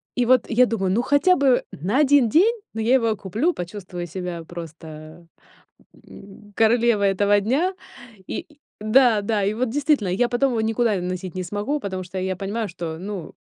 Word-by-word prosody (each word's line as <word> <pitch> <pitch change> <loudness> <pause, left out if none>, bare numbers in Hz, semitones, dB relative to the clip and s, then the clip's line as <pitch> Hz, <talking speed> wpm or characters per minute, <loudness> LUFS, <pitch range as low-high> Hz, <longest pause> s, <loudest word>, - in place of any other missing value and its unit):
И 245 -1 +1
вот 255 -1 +3
я 250 +2 +4
думаю: 195 -5 -1
"Ну 230 +5 +2
хотя 285 +8 +3
бы 270 -3 +3
на 200 - -1
1 285 -4 +4
день, 400 - +4 0.2
но 225 - -4
я 240 +4 +3
его 230 -4 +1
куплю, 225 - -1
почувствую 180 -1 -7
себя 180 -1 -6
просто, 160 0 -10 0.8
м, 205 +1 -14
королевой 225 -3 +3
этого 205 +1 +2
дня". 295 - 0 0.5
И - - -5 0.3
да, 220 -1 +4
да, 205 -1 -1
и 205 +2 0
вот 240 +1 -1
действительно, 280 - +1
я 240 +7 +1
потом 250 +2 +1
его 225 -2 0
никуда 225 -1 +1
носить 185 0 -5
не 185 - -3
смогу, 205 +11 -3
потому 190 -5 -5
что 185 +1 -8
я 185 0 -2
понимаю, 205 +3 -3
что, 165 -2 -6
ну, 190 -4 -7
210 Hz, 180 wpm, -22 LUFS, 185-245 Hz, 0.8 s, я